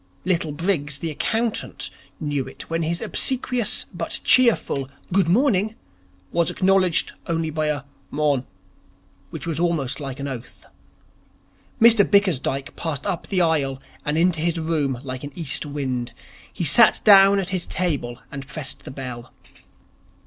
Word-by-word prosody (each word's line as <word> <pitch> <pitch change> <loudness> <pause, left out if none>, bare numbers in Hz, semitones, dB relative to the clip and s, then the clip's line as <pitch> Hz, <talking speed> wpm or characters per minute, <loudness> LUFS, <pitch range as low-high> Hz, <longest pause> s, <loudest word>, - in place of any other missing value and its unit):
Little 170 -4 0
Briggs, 145 -3 -1
the 160 +2 -4
accountant, 225 +8 -2 0.3
knew 145 -4 -2
it - - -9
when 165 0 0
his 170 +1 -2
obsequious 250 -3 +1
but 170 -1 -3
cheerful 225 - +3 0.2
'Good 190 -3 +3
morning' 215 -1 +2 0.6
was 170 -1 +1
acknowledged 185 -2 +2
only 165 -2 -1
by 155 0 -1
a 145 -2 -1 0.3
'Morn'' 145 -3 0 0.8
which - - -7
was 165 -2 -2
almost 165 -7 0
an 140 -1 -5
oath. 130 -3 -8 1.1
Mr 230 -2 +7
Bickersdyke 165 -10 +1
passed 155 -4 -4
up 185 -4 -3
the 190 -3 +1
aisle 145 -5 +1 0.2
and 150 +1 -1
into 165 -2 +2
his 170 0 0
room 150 -6 -1
like 130 -1 -6
an 145 -1 -7
east 150 -3 0
wind. 130 -4 -3 0.4
He - - -4
sat - - +5
down 195 -1 +7
at 190 -2 -1
his 185 -2 -1
table 145 -10 -2
and 135 0 -7
pressed 150 -2 -5
the - - -7
bell. 125 -3 -7
160 Hz, 140 wpm, -22 LUFS, 140-185 Hz, 1.1 s, Mr